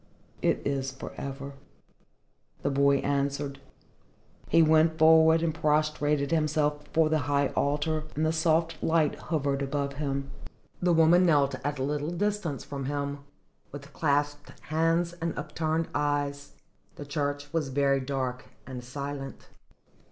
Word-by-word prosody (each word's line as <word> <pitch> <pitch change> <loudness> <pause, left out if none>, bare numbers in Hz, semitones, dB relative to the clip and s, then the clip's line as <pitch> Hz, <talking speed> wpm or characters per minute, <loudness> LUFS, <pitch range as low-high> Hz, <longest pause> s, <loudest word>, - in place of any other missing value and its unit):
"It - - 0
is 135 -1 -1
for 130 - -9
ever," 140 0 -6 1.1
the 140 - +1
boy 140 0 +4
answered. 140 0 -1 0.9
He 165 - +5
went 160 +1 +4
forward 160 +1 +6
and 165 -2 0
prostrated 150 -2 +1
himself 150 -2 +1
before 160 -1 +1
the 155 0 +2
high 140 -1 +2
altar, 150 +2 -1
and 155 +2 0
the 160 - +2
soft 165 0 +1
light 160 -2 +2
hovered 140 -3 -2
above 140 0 -2
him. 140 -2 -3 0.5
The 180 0 +3
woman 165 +2 +5
knelt 140 -4 +3
at 145 +1 -2
a 130 - -2
little 145 +2 -2
distance 180 -4 -2
from 140 -2 -6
him, 140 0 -3 0.5
with 140 0 -10
clasped 145 -1 -1
hands 165 +2 +1
and 165 0 -2
upturned 155 +2 -2
eyes. 145 -1 -1 0.4
The 145 - -8
church 145 0 -3
was 155 -4 0
very 140 0 +2
dark 130 -1 -3 0.2
and 125 -1 -7
silent. 140 +2 -7
145 Hz, 135 wpm, -28 LUFS, 140-160 Hz, 1.1 s, forward